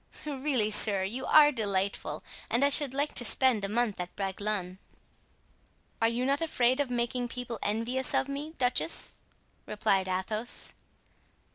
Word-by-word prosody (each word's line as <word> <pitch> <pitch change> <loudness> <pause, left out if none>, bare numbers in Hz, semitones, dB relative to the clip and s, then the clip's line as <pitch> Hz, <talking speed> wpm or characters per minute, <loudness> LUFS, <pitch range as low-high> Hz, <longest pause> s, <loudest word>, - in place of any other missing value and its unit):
"Really, 270 -6 0
sir, 205 -2 +6
you 235 +8 -4
are 300 -1 +6
delightful, 200 -5 -1 0.3
and 245 +4 +2
I - - +3
should 285 -1 +2
like 285 +2 -1
to - - +1
spend 245 -4 +3
a 195 - -2
month 225 -2 -1
at 180 0 -6
Bragelonne." 195 -1 -3 1.2
"Are 225 - +4
you 235 +2 -1
not 280 +3 +1
afraid 255 -5 +1
of 285 -3 -1
making 245 0 -2
people 240 -1 -6
envious 230 +5 0
of 270 - +1
me, 290 +3 -6
duchess?" 250 +6 -1 0.5
replied 195 -2 0
Athos. 215 +5 -1
240 Hz, 145 wpm, -29 LUFS, 205-265 Hz, 1.2 s, sir